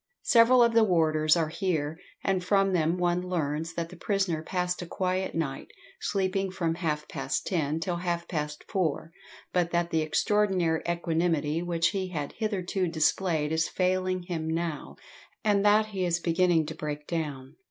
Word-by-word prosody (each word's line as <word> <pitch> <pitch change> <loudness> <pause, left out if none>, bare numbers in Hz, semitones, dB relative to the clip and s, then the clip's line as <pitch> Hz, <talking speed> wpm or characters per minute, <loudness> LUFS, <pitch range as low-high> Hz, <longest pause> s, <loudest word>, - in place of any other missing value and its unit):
Several 240 +1 +6
of 235 -1 +3
the 230 0 +6
warders 155 -4 +3
are 160 -2 0
here, 160 -3 -2 0.2
and 190 -2 0
from 195 0 +2
them 170 0 +2
one 175 0 +1
learns 165 -3 -2
that 170 -1 -3
the - - -11
prisoner 195 -6 -1
passed 180 +1 -2
a 175 - -6
quiet 185 +1 -2
night, 150 -5 -3 0.3
sleeping 195 - 0
from 170 -3 -1
half 155 -3 -2
past - - -3
ten 155 -4 0
till 175 +1 -2
half 170 -1 -2
past 150 -2 -4
four, 165 -4 -1 0.4
but 175 -2 +2
that 170 0 0
the 160 - +2
extraordinary 180 0 +1
equanimity 165 -2 0
which 170 -1 +1
he 195 -2 -2
had 150 -6 -4
hitherto 195 -4 -2
displayed 160 -1 +1
is 160 0 +1
failing 185 0 0
him 170 -3 -4
now, 165 -1 -3 0.5
and 205 -2 +3
that 210 +1 +5
he 195 -3 -2
is 175 -1 +1
beginning 170 -1 +2
to 155 - -5
"break 150 -1 -5
down." 150 -4 -4
175 Hz, 165 wpm, -28 LUFS, 160-185 Hz, 0.5 s, Several